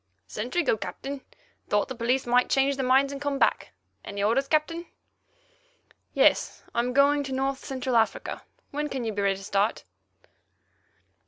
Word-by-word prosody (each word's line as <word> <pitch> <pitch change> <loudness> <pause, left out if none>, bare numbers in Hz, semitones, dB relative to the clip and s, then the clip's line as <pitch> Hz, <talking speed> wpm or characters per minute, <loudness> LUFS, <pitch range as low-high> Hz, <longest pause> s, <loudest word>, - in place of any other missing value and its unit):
"Sentry 250 +11 -2
go, 230 - +2
Captain. 275 +5 -6 0.5
Thought 205 0 +2
the - - -5
police 250 +2 0
might 245 +1 +3
change 275 +1 +2
their 265 - -2
minds 270 +2 +4
and 280 - -7
come 285 -1 -1
back. 240 - +1 0.3
Any 200 0 -4
orders, 245 +6 +2
Captain?" 330 +3 0 1.3
"Yes. - - +3
I - - 0
am 245 +1 0
going 280 +2 +4
to 270 - -6
North 270 +1 -1
Central 260 -2 -2
Africa. 225 -1 0 0.3
When 295 +1 -2
can 265 -3 -3
you 220 -1 -2
be 205 - -2
ready 195 -1 +2
to 195 - -11
start?" 200 +2 0
265 Hz, 165 wpm, -27 LUFS, 230-280 Hz, 1.3 s, minds